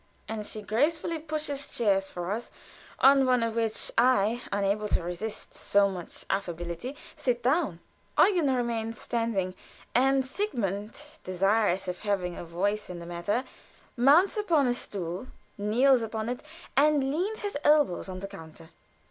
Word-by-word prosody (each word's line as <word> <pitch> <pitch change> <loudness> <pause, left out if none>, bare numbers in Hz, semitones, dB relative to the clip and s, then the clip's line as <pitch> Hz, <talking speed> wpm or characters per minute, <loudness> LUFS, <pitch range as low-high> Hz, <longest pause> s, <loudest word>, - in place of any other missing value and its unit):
And 215 -1 -4
she 215 - -5
gracefully 310 +9 0
pushes 300 -3 -3
chairs 195 -4 +1
for 175 +1 -4
us; 230 +3 -3 0.5
on 275 0 +6
one 250 -2 +3
of 230 -1 -1
which 225 -2 0
I, 240 -2 +3
unable 200 +1 0
to 180 - 0
resist 180 +5 -5
so 200 0 +3
much 180 -3 -7
affability, 175 - -3 0.2
sit 250 -6 -1
down. 265 - +1 0.4
Eugen 345 -9 +4
remains 230 -2 -2
standing; 225 -6 -1 0.4
and 265 +1 +3
Sigmund, 225 - -3 0.2
desirous 195 +1 +1
of 180 0 -3
having 190 -4 -1
a - - -6
voice 195 +5 -1
in 180 - -6
the 170 - -8
matter, 175 +8 -1 0.5
mounts 295 - +5
upon 335 -9 +3
his 245 0 +1
stool, 185 +3 -5 0.3
kneels 240 +5 +3
upon 220 0 -3
it, 245 - -3 0.3
and 280 -1 +3
leans 395 +8 -1
his 410 -1 -3
elbows 295 -12 +3
on 185 0 -6
the 195 - -4
counter. 160 -2 -12
225 Hz, 150 wpm, -28 LUFS, 195-270 Hz, 0.5 s, on